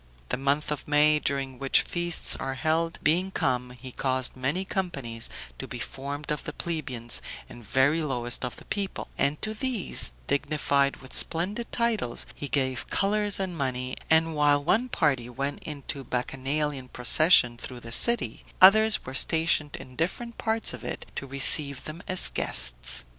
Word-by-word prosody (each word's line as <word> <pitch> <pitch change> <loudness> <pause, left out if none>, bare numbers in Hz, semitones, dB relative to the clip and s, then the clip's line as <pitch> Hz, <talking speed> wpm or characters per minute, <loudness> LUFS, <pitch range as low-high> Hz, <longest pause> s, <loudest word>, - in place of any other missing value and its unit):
The - - 0
month 140 +3 0
of 150 - -4
May, 150 +1 +4
during 135 -3 -3
which 135 -1 +3
feasts 175 -1 -1
are 135 0 -4
held, 160 +5 -1
being 175 +6 +2
come, 125 -8 -1
he 130 -1 -8
caused 130 0 -1
many 140 +9 -2
companies 140 - -2 0.3
to - - -5
be - - -6
formed 145 +2 -6
of 150 - -3
the - - -6
plebeians 130 -9 -3 0.3
and 120 - -12
very 135 +9 +2
lowest 125 -5 -2
of 125 - -4
the - - -15
people, 200 -2 -3
and 140 +2 0
to 215 - -2
these, 220 - -1
dignified 140 -1 0
with 130 - -12
splendid 200 +8 0
titles, 225 - 0
he 145 - -5
gave 130 -3 -1
colors 205 0 +2
and 190 -2 -3
money; 130 -3 -3
and 160 0 +3
while 145 -1 +3
one 220 - +1
party 135 - 0
went 140 +3 -4
in 150 -2 -6 0.3
bacchanalian 135 +2 -2
procession 125 0 +5
through 120 +1 -8
the 115 - -10
city, 235 - +4 0.2
others 215 +3 +6
were 130 - -7
stationed 160 +1 +2
in 130 - -11
different 230 - -3
parts 225 0 0
of - - -9
it, - - -5
to 135 - -5
receive 140 +1 +4
them 155 +3 -8
as 185 0 +5
guests. 60 +1 0
145 Hz, 165 wpm, -27 LUFS, 130-170 Hz, 0.3 s, others